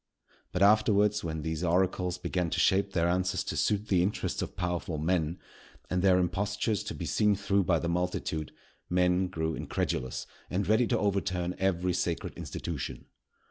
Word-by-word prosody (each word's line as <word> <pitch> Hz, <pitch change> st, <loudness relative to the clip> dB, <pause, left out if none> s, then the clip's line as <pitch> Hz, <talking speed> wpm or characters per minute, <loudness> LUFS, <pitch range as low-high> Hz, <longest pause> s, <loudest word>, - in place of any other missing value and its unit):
But, 90 Hz, -, +1 dB
afterwards, 105 Hz, 0 st, +4 dB
when 80 Hz, -2 st, -3 dB
these 80 Hz, +1 st, -2 dB
oracles 90 Hz, +1 st, +1 dB
began 90 Hz, -1 st, -1 dB
to -, -, -1 dB
shape 100 Hz, 0 st, +3 dB
their 85 Hz, -1 st, +2 dB
answers 90 Hz, +1 st, 0 dB
to -, -, -4 dB
suit 105 Hz, 0 st, +1 dB
the 95 Hz, -4 st, +3 dB
interests 95 Hz, +4 st, -1 dB
of -, -, -5 dB
powerful 90 Hz, -2 st, -2 dB
men, 80 Hz, +1 st, 0 dB, 0.5 s
and 90 Hz, 0 st, +1 dB
their 95 Hz, -1 st, +5 dB
impostures 100 Hz, +3 st, 0 dB
to -, -, -4 dB
be -, -, -5 dB
seen 105 Hz, -1 st, +2 dB
through 100 Hz, -1 st, +1 dB
by 85 Hz, -1 st, +3 dB
the 85 Hz, -, -2 dB
multitude, 85 Hz, -3 st, -2 dB, 0.4 s
men 90 Hz, +1 st, +2 dB
grew 80 Hz, -3 st, -2 dB
incredulous 65 Hz, -4 st, -2 dB, 0.2 s
and 95 Hz, +2 st, -1 dB
ready 110 Hz, +3 st, +4 dB
to -, -, +1 dB
overturn 95 Hz, -3 st, 0 dB
every 90 Hz, -1 st, +1 dB
sacred 85 Hz, -1 st, -2 dB
institution. 80 Hz, -6 st, -5 dB
90 Hz, 165 wpm, -29 LUFS, 85-100 Hz, 0.5 s, their